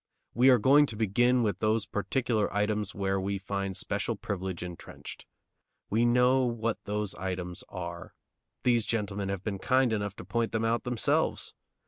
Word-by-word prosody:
We 125 +4 +5
are 125 - +7
going 140 +6 +5
to 115 - -6
begin 120 +4 +3
with 100 -4 -1
those 110 0 +1
particular 110 +1 0
items 105 0 -1
where 95 -1 0
we 100 +1 -1
find 95 0 -3
special 105 +3 -1
privilege 95 -3 -4
intrenched. 90 -1 -9 0.6
We 115 +3 +3
know 125 +2 +4
what 115 -2 -1
those 105 -1 -2
items 90 -1 -4
are; 85 -1 -7 0.5
these 120 -3 +2
gentlemen 100 -3 -2
have 100 -1 -3
been 100 -2 -3
kind 130 +1 +3
enough 105 -2 -2
to - - -9
point 115 +4 -1
them 110 0 0
out 115 +2 0
themselves. 125 -2 0
105 Hz, 160 wpm, -29 LUFS, 95-120 Hz, 0.6 s, are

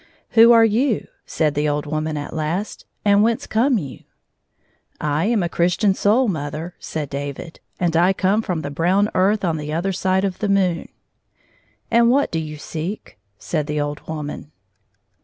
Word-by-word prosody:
" - - -38
Who 230 0 +7
are 230 -1 +7
you? 225 +2 +1
" - - -44
said 155 -2 0
the 150 0 0
old 145 0 -1
woman 155 +1 -2
at 145 - -6
last, 165 +6 -3
" - - -47
and 200 0 +5
whence 225 +1 +1
come 245 +3 +2
you? 140 -9 -6 0.6
" - - -41 0.2
"I 165 - +1
am 220 -3 +1
a - - 0
Christian 175 +4 +1
soul, 220 +7 +2
mother," 160 -1 -4
said 155 -2 -4
David, 140 +4 -6
" - - -42
and 170 -2 0
I 175 +3 +4
come 195 +3 +1
fi 205 - -4
om 160 - -3
the 145 - -4
brown 185 +7 +1
earth 195 +2 +2
on 165 -2 0
the 150 0 -5
other 170 +5 -1
side 190 0 0
of 190 -2 -2
the 210 - -1
moon." 185 -4 +1 0.5
" - - -38
And 235 0 +5
what 280 +3 +2
do 165 - -1
you 155 -1 -6
seek 160 - -6
?" 100 - -48
said 150 +6 -3
the 150 -1 -2
old 145 0 -2
woman. 150 -1 -6
175 Hz, 205 wpm, -21 LUFS, 150-205 Hz, 0.6 s, Who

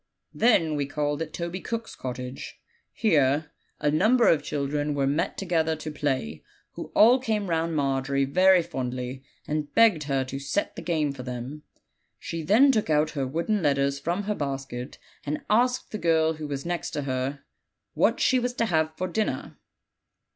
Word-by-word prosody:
"We - - -14
then 160 - +3
called 145 +1 -2
at 160 -1 -4
Toby 170 +3 -4
Cook's 230 -1 -4
cottage. 125 0 -7 0.3
Here 150 - +2 0.3
a 145 - +1
number 225 +10 +4
of 155 - +4
children 145 0 -2
were 140 -1 +1
met 145 +4 0
together 165 -4 0
to 155 0 -6
play, 130 - -2 0.3
who - - -7
all 240 +5 +7
came 215 -7 -1
round 165 0 0
Margery 135 -1 0
very 185 +5 +5
fondly, 130 -4 -5 0.2
and 150 -1 -2
begged 215 -10 +5
her 135 -2 0
to 135 +1 -5
'set 140 +9 -2
the - - -6
game' 160 -3 0
for 140 - -8
them. 125 +4 -6 0.6
She 165 - -5
then 225 - +5
took 215 -8 0
out 155 0 +2
her 140 -4 -2
wooden 170 +9 -1
let 145 -3 +3
ters 140 0 0
from 175 +7 -2
her 210 +1 -1
basket, 135 -5 -5 0.3
and 150 +1 -3
asked 250 +3 +2
the 215 - -4
girl 160 -2 +2
who 155 -1 -6
was 140 0 -4
next 175 -1 -2
to 145 - -1
her 135 +1 -3 0.5
what - - +2
she 260 - +3
was 245 0 -2
to 230 - +1
have 160 -5 0
for 185 - -2
dinner. 215 +4 -2
155 Hz, 175 wpm, -26 LUFS, 140-180 Hz, 0.6 s, all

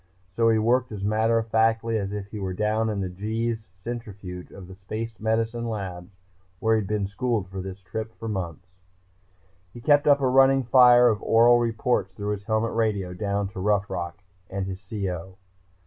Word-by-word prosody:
So 115 +4 +2
he 110 - +4
worked 120 +3 +2
as 100 -2 -6
matter 110 +2 +2
of 115 0 -2
factly 115 +1 +2
as 100 -1 -3
if 105 -1 -4
he 105 - -6
were 95 -2 -3
down 110 +2 0
in 105 -2 -2
the 110 +6 -2
Gs 110 -2 -10
Centrifuge 95 -3 -7
of 95 -2 -11
the 95 - -10
Space 110 +4 -6
Medicine 115 +2 -1
Labs 90 -5 -5 0.5
where 110 +3 +2
he 110 - +2
had 100 - -6
been 105 -1 -1
schooled 105 0 -2
for 95 0 -5
this 95 +1 -8
trip 110 +4 -5
for 115 - -6
months. 90 -4 -4 1.1
He 120 - -11
kept 145 +4 +3
up 145 -1 +6
a 135 - +1
running 135 +1 +5
fire 125 0 +7
of 110 -3 +1
oral 120 +1 +5
reports 115 -3 0
through 105 +1 -3
his 100 -1 -4
helmet 110 +1 0
radio, 105 -5 0
down 100 +1 -2
to 100 - -8
Rough 100 +1 +1
Rock 85 -1 -4 0.3
and 100 0 -3
his 95 0 -6
CO. 95 -3 -4
110 Hz, 195 wpm, -25 LUFS, 95-115 Hz, 1.1 s, fire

